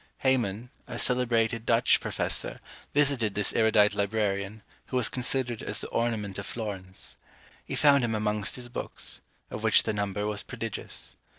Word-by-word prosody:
Heyman, 120 -3 +1 0.2
a - - -6
celebrated 115 -2 +1
Dutch 115 0 +4
professor, - - -2 0.3
visited 135 -8 +2
this 105 0 +2
erudite 110 -2 +4
librarian, 100 0 -1 0.2
who 130 - -1
was 120 -4 +4
considered 125 -2 -1
as - - 0
the - - -4
ornament 105 -4 -1
of 100 - -6
Florence. 95 -5 -6 0.5
He - - -5
found 140 -3 +5
him 115 -2 0
amongst 105 -2 0
his 125 -1 -6
books, 120 - +1 0.3
of 105 - -5
which 110 -2 +5
the 110 - -1
number 100 0 -2
was 105 -1 -2
prodigious. - - -6
110 Hz, 155 wpm, -28 LUFS, 105-120 Hz, 0.5 s, found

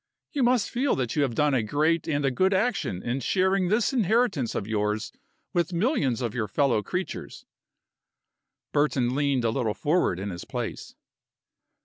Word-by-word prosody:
You 285 - -1
must 245 -2 +2
feel 260 +3 +1
that 125 -3 -2
you 150 - +2
have 130 -5 0
done 150 +1 +2
a 130 - +3
great 155 +9 +1
and 145 -3 0
a 135 - +2
good 190 +8 +2
action 190 - -1
in 120 +3 -1
sharing 190 +6 +1
this 215 +7 +1
inheritance 220 - +1
of 100 - -2
yours 105 0 -1 0.4
with 175 0 0
millions 170 - +1
of 115 -3 -2
your 115 -4 -2
fellow 130 -5 +2
creatures." 180 - -5 1.3
Burton 140 -4 +1
leaned 140 -3 +1
a 115 - +2
little 110 -2 -1
forward 150 - +1
in 100 +1 -4
his 85 - -7
place. - - -5
145 Hz, 165 wpm, -26 LUFS, 120-190 Hz, 1.3 s, a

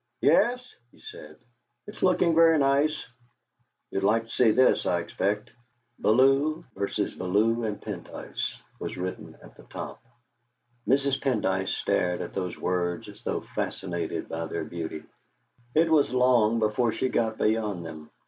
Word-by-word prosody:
"Yes," 250 +1 +3 0.2
he - - -22
said, 75 0 -11 0.5
"it's - - -11
looking 180 -2 +3
very 165 0 +6
nice. 145 +2 +2 0.9
You'd 95 - -2
like 110 +3 +3
to 115 - -14
see 125 -3 +4
this, 130 +4 +3
I 90 - +2
expect." 100 +5 -2 0.5
"Bellew 135 +8 +3
v. 100 +1 -2
Bellew 110 +6 +1
and 105 -2 -3
Pendyce" - - -5 0.2
was - - -5
written 90 +1 -6
at - - -15
the - - -16
top. - - -8 0.9
Mrs. 135 0 +2
Pendyce 95 -8 0
stared 90 0 0
at - - -6
those 90 -2 -3
words 90 -1 -2
as - - -14
though - - -2
fascinated 85 -4 -3
by 80 0 -4
their 80 0 -4
beauty; 80 -1 -6 0.7
it 160 +1 +4
was 150 -3 +4
long 125 -3 +3
before 110 +2 +1
she 130 - -1
got 115 -3 0
beyond 105 -5 0
them. 80 -1 -9
110 Hz, 145 wpm, -27 LUFS, 90-135 Hz, 0.9 s, very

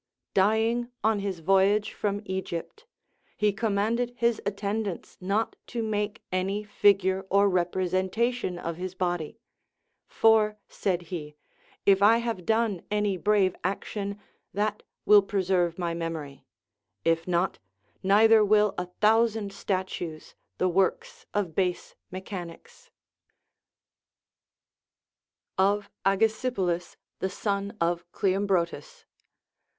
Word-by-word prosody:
Dying 225 +4 +2
on 220 -1 +2
his 195 -4 -4
voyage 195 +4 +3
from 205 0 -2
Egypt, 190 - -5 0.5
he 210 -1 +2
commanded 225 +3 0
his 235 -2 +1
attendants 200 -1 -3
not 200 +5 0
to 235 -2 -3
make 210 0 -2
any 190 +3 -1
figure 195 -2 +3
or 200 +1 +4
representation 185 +4 0
of 170 -1 -5
his 185 +1 -5
body; 175 -3 -2 0.7
For, 215 -1 +3
said 180 -3 -2
he, 150 -3 -5 0.5
if 195 -1 +5
I 220 +3 +6
have 230 -6 -3
done 220 -5 +1
any 210 -1 +1
brave 195 0 +2
action, 200 +1 -3 0.4
that 210 +1 -1 0.2
will 210 -1 +8
preserve 185 -3 0
my 170 -2 -2
memory; 155 -5 -5 0.6
if 165 +1 +1
not, 180 +1 0 0.4
neither 215 +3 +6
will 210 -1 +4
a 180 - -3
thousand 220 -1 +3
statues, 185 -5 -4 0.2
the 185 - +2
works 455 - 0
of 195 -6 -1
base 180 0 -1 0.2
mechanics. 185 -2 -9 2.7
Of 200 +1 +2 0.2
AgesipoUs 195 -3 0 0.2
the 190 - -1
Son 200 +2 -3
of 170 +1 -1
Cleombrotus. 190 -6 -1
200 Hz, 105 wpm, -27 LUFS, 180-210 Hz, 2.7 s, will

